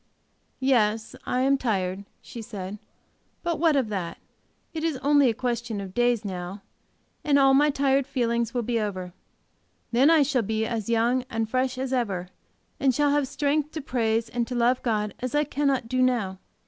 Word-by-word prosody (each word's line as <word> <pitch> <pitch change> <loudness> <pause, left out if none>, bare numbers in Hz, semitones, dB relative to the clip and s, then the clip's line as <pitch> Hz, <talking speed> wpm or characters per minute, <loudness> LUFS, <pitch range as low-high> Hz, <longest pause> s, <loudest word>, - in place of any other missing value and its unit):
"Yes, 225 -5 +1
I 250 - +1
am 270 +1 +3
tired," 195 -5 -1 0.2
she 235 - -8
said, 205 -2 -7 0.6
"but 340 -3 -1
what 320 -2 +3
of 260 -6 +1
that? 185 -5 -4 0.6
It 320 -1 -4
is 325 -4 0
only 285 -2 +5
a - - +1
question 240 -3 -2
of 195 -2 -7
days 240 -1 +1
now, 185 +1 -5 0.6
and 290 -2 +3
all 270 -1 +5
my 290 +2 +5
tired 275 -1 +1
feelings 235 -2 0
will 245 -1 -1
be 235 +1 0
over. 185 -4 -4 0.8
Then 255 +5 +5
I 320 -3 +6
shall 270 -3 +1
be 220 +1 -1
as 225 -2 -3
young 235 +2 +2
and 225 0 -1
fresh 255 +2 -1
as 265 0 -3
ever, 195 -8 -1 0.5
and 265 -3 +2
shall 290 0 +3
have 290 -2 +1
strength 290 +2 -1
to 315 - -4
praise 230 -4 0
and 240 -1 -2
to 250 - -4
love 245 +1 +2
God 210 -3 -1
as 255 +2 -3
I 295 - +3
cannot 275 -4 0
do 255 +2 0
now. 225 -7 +1
245 Hz, 185 wpm, -26 LUFS, 220-275 Hz, 0.8 s, I